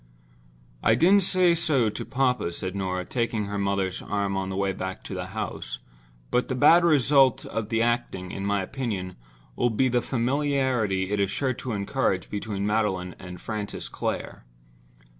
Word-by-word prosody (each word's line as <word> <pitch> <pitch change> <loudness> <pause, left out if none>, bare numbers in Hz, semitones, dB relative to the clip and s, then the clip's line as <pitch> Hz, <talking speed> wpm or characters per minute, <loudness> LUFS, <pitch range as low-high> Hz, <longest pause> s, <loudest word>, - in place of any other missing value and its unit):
"I 110 - +4
didn't 185 - +5
say 185 -2 +4
so 140 -9 +2
to - - -6
papa," 125 -8 0
said 95 +2 -4
Norah, 95 -2 -2
taking 115 -2 -1
her 100 0 -3
mother's 100 -2 -1
arm 100 -1 -1
on 95 0 -2
the 95 - -4
way 100 0 0
back 95 0 -5
to - - -7
the - - -4
house, - - -5 0.5
"but 125 - +2
the 130 - -2
bad 165 +6 +6
result 140 -5 +4
of 110 -2 -4
the 115 0 +2
acting, 115 -6 -1
in 95 - -5
my 100 -1 0
opinion, 95 -6 -4 0.4
will 120 - +2
be 130 +4 +2
the 120 0 +2
familiarity 125 -7 0
it 105 - 0
is 100 -1 +2
sure 130 +6 -1
to 125 0 -5
encourage 100 -1 -1
between 100 -1 -3
Magdalen 100 -4 0
and 90 0 -9
Francis 105 -2 -5
Clare." - - -4
110 Hz, 170 wpm, -26 LUFS, 95-130 Hz, 0.5 s, bad